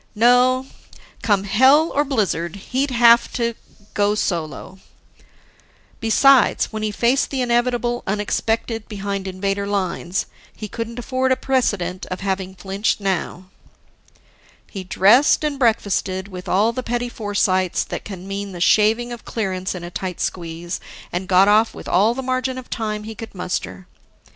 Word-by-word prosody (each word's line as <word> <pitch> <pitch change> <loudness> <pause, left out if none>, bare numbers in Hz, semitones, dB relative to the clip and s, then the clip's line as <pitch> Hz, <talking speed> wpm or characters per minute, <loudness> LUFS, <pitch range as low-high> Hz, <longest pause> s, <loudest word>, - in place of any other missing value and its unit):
No, 250 +3 +4 0.6
come 205 -3 +2
hell 265 +10 +4
or 290 - +2
blizzard, 200 - -1
he'd 260 +8 -2
have 235 -1 +5
to 235 -1 -1 0.4
go 205 0 +2
solo. 175 -1 -3 1.2
Besides, 250 +2 +4
when 215 - -3
he 215 - 0
faced 235 +6 +1
the 270 -2 -2
inevitable 240 0 0
unexpected 220 +2 -1
behind 200 -1 -4
Invader 195 +1 -2
lines, 190 -2 -2 0.3
he 215 - -6
couldn't 230 +2 -6
afford 260 +1 -1
a - - +5
precedent 205 -10 -1
of 185 - -5
having 190 -1 -3
flinched 195 +3 -1
now. 185 -1 -3 1.2
He 195 -3 -6
dressed 215 +12 +4
and 295 -2 -2
breakfasted 200 -5 0
with 180 -2 -8
all 210 +5 +2
the 255 - -3
petty 245 0 -2
foresights 200 -5 0
that - - -6
can 190 -2 -8
mean 200 0 -5
the 175 - -7
shaving 220 +6 +3
of 235 - -10
clearance 190 -4 -3
in 180 - -7
a 175 - -7
tight 180 -1 -5
squeeze, 170 0 -4 0.3
and 180 +2 -3
got 190 0 +5
off 215 +2 +4
with - - -9
all 210 +6 +3
the 265 - -4
margin 255 0 -1
of 255 - -9
time 215 -2 -3
he 220 +1 -7
could 225 -1 -10
muster. 95 - -4
210 Hz, 150 wpm, -21 LUFS, 190-240 Hz, 1.2 s, have